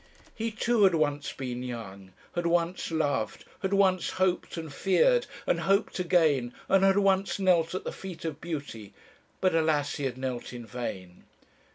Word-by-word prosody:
"He 225 +1 -2
too 225 0 +1
had 185 -3 +4
once 145 -2 0
been 125 -2 -5
young, 100 -6 -7 0.2
had 175 -1 -1
once 170 +1 0
loved, 145 -8 -1 0.2
had 190 - -1
once 190 -3 +3
hoped 185 -2 0
and 160 -3 -6
feared, 485 - +3 0.2
and - - +1
hoped 195 0 +1
again, 155 -9 +2
and 195 0 +4
had 195 0 +5
once 195 -1 +2
knelt 180 -3 +2
at 185 - -3
the - - -4
feet 185 -4 -8
of 155 -2 -4
beauty. 140 - -6 0.5
But 185 -2 +3
alas! 155 -3 +1
he 145 - -3
had 130 -2 -3
knelt 130 -2 -4
in 120 -1 -7
vain. 100 -6 -6
165 Hz, 170 wpm, -28 LUFS, 130-190 Hz, 0.5 s, had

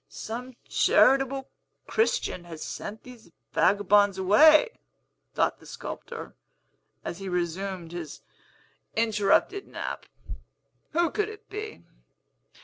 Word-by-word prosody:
"Some 245 +3 -7
charitable 270 0 +3 0.4
Christian 445 - 0
has 165 -2 -8
sent 215 +2 -6
those 245 -6 -14 0.2
vagabonds 205 0 +4
away," 310 - +6 0.6
thought - - +1
the - - -16
sculptor, - - -7 0.7
as 170 - -5
he 195 -1 -5
resumed 180 0 -3
his 170 -4 -7 0.7
interrupted 220 - +2
nap; - - -5 0.9
"who 340 +1 +2
could 420 0 -1
it 435 0 -12
be? 425 +1 -6
220 Hz, 100 wpm, -27 LUFS, 190-310 Hz, 0.9 s, away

